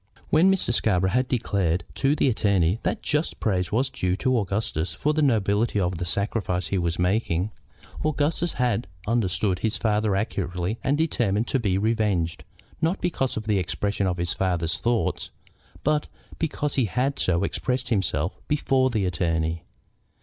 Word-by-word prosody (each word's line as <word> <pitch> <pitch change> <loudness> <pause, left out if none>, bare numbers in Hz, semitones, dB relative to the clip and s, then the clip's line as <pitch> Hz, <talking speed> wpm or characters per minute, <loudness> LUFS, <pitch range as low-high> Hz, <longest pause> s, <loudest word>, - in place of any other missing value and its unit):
When 175 +5 +6
Mr. 185 -10 +1
Scarborough 95 -5 +2
had 125 +3 +2
declared 95 -8 0
to 140 +2 +2
the 145 - +2
attorney 100 -5 +2
that - - -2
just 150 +2 -1
praise 90 -4 0
was 130 +5 +2
due 90 -8 0
to 130 +5 +1
Augustus 95 -4 -2
for 150 - +1
the 155 - +1
nobility 110 -4 +2
of 90 -2 0
the 90 - -3
sacrifice 90 -3 -1
he 95 - +1
was 85 -1 -1
making, 90 0 +1 0.5
Augustus 155 +3 0
had 120 -4 0 0.2
understood 95 -4 +1
his 110 0 0
father 105 -2 +1
accurately 95 0 -2
and 140 +2 +2
determined 120 -9 +1
to 135 - +1
be 100 -5 +1
revenged, 105 -6 0 0.4
not 165 +4 +1
because 150 -9 -1
of 110 - -3
the 105 -3 +2
expression 100 +2 -1
of 90 -1 -1
his 85 -1 0
father's 85 -4 -1
thoughts, 120 -1 0 0.5
but 150 0 +1 0.3
because 150 -2 -1
he 130 - +2
had 130 +7 -1
so 85 0 +1
expressed 125 +3 -2
himself 95 - 0
before 135 -3 +2
the 110 -6 0
attorney. 80 -2 0
105 Hz, 160 wpm, -25 LUFS, 90-130 Hz, 0.5 s, When